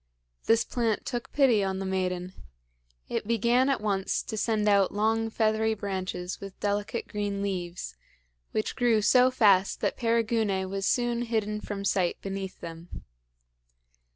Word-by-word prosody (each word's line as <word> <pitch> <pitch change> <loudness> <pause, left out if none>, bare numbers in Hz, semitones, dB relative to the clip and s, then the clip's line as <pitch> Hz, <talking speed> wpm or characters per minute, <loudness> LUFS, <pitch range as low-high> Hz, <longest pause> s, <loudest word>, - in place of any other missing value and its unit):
This 225 0 +4
plant 230 -3 -1
took 240 -2 -4
pity 250 -8 +4
on 190 -1 -1
the 195 - -4
maiden. 185 -1 -2 0.7
It - - -3
began 235 +3 +3
at 275 - 0
once 195 -3 0
to 220 - -5
send 215 -1 0
out 200 -2 +4
long 225 +2 +1
feathery 220 0 +1
branches 185 -3 -4
with 195 -1 -9
delicate 205 +3 -2
green 205 -1 -3
leaves, 180 -3 -4 0.6
which 215 - -2
grew 235 -4 +2
so 250 +3 +5
fast 200 -6 +3
that - - 0
Perigune 225 -5 +1
was 195 -1 -1
soon 240 -1 +1
hidden 215 -3 -1
from 200 -1 -5
sight 185 -3 +1
beneath 195 -1 -6
them. 165 +1 -9
210 Hz, 145 wpm, -28 LUFS, 195-230 Hz, 0.7 s, so